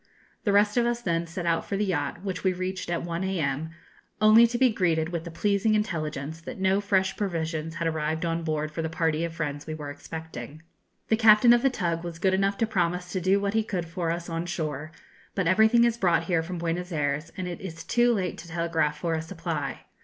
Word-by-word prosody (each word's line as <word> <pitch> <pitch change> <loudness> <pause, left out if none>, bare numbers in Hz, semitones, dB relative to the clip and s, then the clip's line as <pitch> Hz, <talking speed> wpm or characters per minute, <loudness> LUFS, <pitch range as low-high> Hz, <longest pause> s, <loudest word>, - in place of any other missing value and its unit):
The 205 - +3
rest 205 +2 +3
of 240 - +4
us 240 0 0
then 170 -6 -1
set 170 +1 -5
out 165 -1 +1
for 200 - -3
the 210 - +1
yacht, 175 -1 -2
which 185 -3 -4
we 185 -1 +3
reached 185 0 -4
at 170 - -1
1 170 +1 -3
a.m., 160 -5 -1 0.5
only 215 +2 +7
to 240 +1 -2
be 255 -1 +4
greeted 165 -5 +1
with 170 -1 -4
the - - -5
pleasing 200 +5 +1
intelligence 160 -6 -2
that - - -7
no 190 +1 +2
fresh 195 -2 +1
provisions 165 -4 -2
had 170 -1 -1
arrived 160 +1 -1
on 165 0 -1
board 155 -1 -2
for 165 - -3
the 160 - -2
party 160 -1 0
of 170 -1 -4
friends 145 -3 -4
we 155 - -4
were 145 -2 -6
expecting. 155 -1 -8 0.5
The 220 - +4
captain 220 +1 +7
of 240 - +4
the 270 - +4
tug 170 -8 -2
was 170 -1 -6
good 190 +2 +2
enough 195 +1 +1
to 225 - +2
promise 180 -3 -1
to 185 - -2
do 190 +3 +3
what 200 0 -1
he 220 - +3
could 185 -5 -3
for 170 0 -3
us 170 +1 -3
on 165 0 -3
shore; 155 -3 -3 0.4
but 195 - 0
everything 220 +6 +5
is 235 -1 +2
brought 175 -7 +2
here 165 -1 +1
from 175 +2 -5
Buenos 170 +2 -2
Ayres, 150 +1 -1
and 185 -1 -3
it 175 - -6
is 165 -4 -7
too 240 0 +3
late 190 -6 -1
to 165 - -10
telegraph 165 -2 0
for 170 -2 -1
a 160 - -1
supply. 165 -2 -4
170 Hz, 230 wpm, -27 LUFS, 160-195 Hz, 0.5 s, only